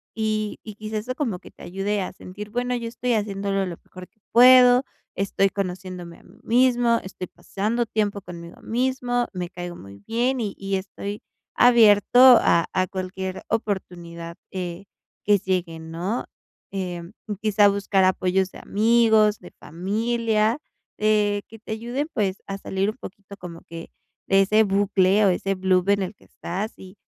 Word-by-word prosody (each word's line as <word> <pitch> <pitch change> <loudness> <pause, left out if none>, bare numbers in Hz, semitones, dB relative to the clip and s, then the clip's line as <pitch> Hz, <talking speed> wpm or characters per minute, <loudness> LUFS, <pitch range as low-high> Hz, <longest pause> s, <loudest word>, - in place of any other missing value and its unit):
y 215 -1 -1
y 215 - -8
quizás 215 0 -4
eso 250 +4 -4
como 235 -11 -2
que - - -15
te - - -19
ayude 195 +3 -2
a 185 - -4
sentir: 205 +3 -9
"Bueno, 245 +2 -1
yo 235 -1 -4
estoy 245 +1 -2
haciéndolo 200 -2 -1
lo 170 -2 -6
mejor 185 0 -12
que 220 +2 -44
puedo, 250 +1 +7 0.3
estoy 195 0 +1
conociéndome 185 -3 -5
a - - -22
mí - - -20
mismo, 240 -1 +3
estoy 185 -1 -7
pasando 225 +8 -2
tiempo 205 -2 -1
conmigo 170 -1 -11
mismo, 245 0 0
me 180 -1 -4
caigo 175 -1 -7
muy 100 -7 -12
bien 245 +3 0
y 210 -4 -3
y 195 0 -2
estoy 200 +2 -6 0.3
abierto 230 -1 +5 0.2
a 170 - +3
a 185 -1 +1
cualquier 190 0 -5
oportunidad, 175 -5 -4
eh, 180 0 -5 0.4
que 205 0 +5
llegue", 180 -3 -2
¿no? 170 +8 -4 0.5
Eh, 180 -3 -4 0.4
quizá 210 -1 +4
buscar 200 -1 +1
apoyos 185 0 +1
de - - -11
amigos, 220 -1 +3
de 180 - -13
familia, 220 - 0 0.4
eh, 210 -1 +2
que 225 0 -13
te 220 - -10
ayuden, 240 +7 -3
pues, 195 -2 0
a 195 0 -4
salir 195 0 -1
un 215 - -6
poquito 200 -2 -11
como 170 -2 -9
que 165 0 -10 0.4
de 195 0 +5
ese 215 +3 +4
bucle 200 0 +3
o - - +5
ese 195 +2 0
blub 185 0 +1
en 200 0 +3
el 190 +3 -6
que - - -23
estás 195 +6 -5
y 190 +2 -13
200 Hz, 165 wpm, -23 LUFS, 185-220 Hz, 0.5 s, puedo